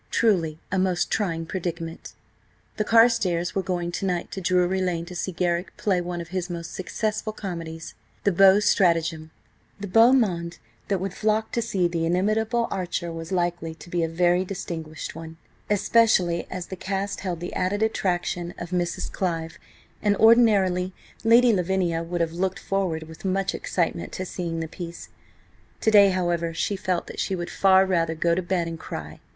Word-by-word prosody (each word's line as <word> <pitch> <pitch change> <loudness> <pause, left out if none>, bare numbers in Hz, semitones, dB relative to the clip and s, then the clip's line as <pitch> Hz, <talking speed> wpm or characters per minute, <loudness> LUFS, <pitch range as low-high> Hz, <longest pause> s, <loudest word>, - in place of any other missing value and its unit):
Truly 175 -9 +2
a 190 - +1
most 185 -1 0
trying 165 -6 -1
predicament. 165 -2 -5 0.6
The 215 - +1
Carstares 220 -7 +3
were 195 - 0
going 175 -2 -2
to 195 - -3
night 175 -2 -2
to 190 - -5
Drury 180 +1 +2
Lane 175 -2 -1
to 180 +1 -9
see 185 - -2
Garrick 175 0 -1
play 190 -4 +1
one 175 0 -4
of 170 -1 -7
his 185 0 -3
most 170 -1 -6
successful 215 +3 -2
comedies: 165 -6 -6 0.3
the 200 - +3
Beaux' 195 +2 +6
Stratagem. 165 -5 +2 0.5
The 225 +4 +5
monde 175 -10 +1 0.3
that 195 -2 0
would 190 0 -3
flock 215 +2 0
to 235 - 0
see 195 -6 +1
the 165 -1 -1
inimitable 215 +6 +1
Archer 175 -2 -3
was 165 +1 -7
likely 175 -3 -1
to 175 - -14
be 175 - 0
a 165 - 0
very 175 +2 +2
distinguished 165 -5 -6
one, 160 0 -9 0.3
especially 205 -4 +3
as 185 -2 -5
the 190 - -5
cast 195 +2 -3
held 180 -4 -3
the 175 - -6
added 205 +4 0
attraction 175 -4 -1
of 175 +1 -7
Mrs. 175 -1 -2
Clive, 165 -2 -3 0.4
and 205 -1 +2
ordinarily 200 -6 +4 0.3
Lady 235 +1 +6
Lavinia 180 -3 0
would 170 +1 -3
have 165 -1 0
looked 190 +2 -1
forward 185 -5 -2
with 160 0 -13
much 195 0 0
excitement 170 -1 -2
to 185 - -4
seeing 170 -2 -4
the 160 - -3
piece. 170 +1 -8 0.7
To 220 - +3
day, 200 -2 +7
however, 175 -3 -1
she 205 - -1
felt 185 -3 -1
that - - -9
she 190 - -1
would 175 -1 -5
far 190 -1 +5
rather 165 -3 0
go 170 +1 +1
to 180 - +1
bed 175 -1 -1
and 165 -1 -6
cry. 80 - -7
180 Hz, 175 wpm, -25 LUFS, 170-195 Hz, 0.7 s, day